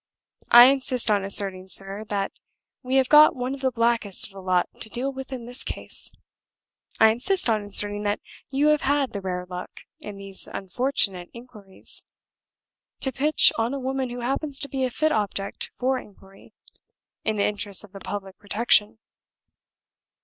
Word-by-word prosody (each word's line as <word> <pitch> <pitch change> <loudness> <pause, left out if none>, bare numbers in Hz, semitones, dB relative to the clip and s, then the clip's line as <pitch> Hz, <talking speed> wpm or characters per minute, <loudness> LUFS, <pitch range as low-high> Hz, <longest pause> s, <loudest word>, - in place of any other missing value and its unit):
I 240 +1 +9
insist 255 -3 +1
on 205 -2 +1
asserting, 195 -1 0
sir, 195 +2 +2
that 200 -1 -2 0.5
we 255 0 -3
have 265 -1 +3
got 300 +2 +6
one 255 +1 -4
of 275 - -8
the 265 - +1
blackest 230 -4 +1
of 200 - -9
the 195 - -10
lot 185 -1 0
to 220 - -3
deal 260 +5 -3
with 265 0 -9
in 250 -3 -7
this 245 +1 +1
case. - - +2 0.9
I 220 - +7
insist 345 - +2
on 215 -2 0
asserting 205 0 +1
that 205 0 -2 0.3
you 280 +2 +1
have 300 -1 +2
had 275 -2 0
the 200 - -5
rare 180 -1 -4
luck, 180 0 -9 0.2
in 205 -1 -9
these 195 -1 -1
unfortunate 195 -3 -1
inquiries, 225 -5 -5 1.0
to 265 - 0
pitch 295 +5 +4
on 230 +4 -1
a - - -4
woman 265 0 -3
who 245 0 -7
happens 275 +3 -2
to 280 - -4
be 265 -1 -2
a - - -2
fit 310 +5 -1
object 200 -4 -2
for 260 +1 -1
inquiry, 195 -2 -18 0.7
in 220 - -1
the 200 - 0
interests 205 -1 0
of 210 - -15
the 195 - -11
public 195 -1 -7
protection. 210 +1 +2
225 Hz, 170 wpm, -24 LUFS, 200-265 Hz, 1.0 s, I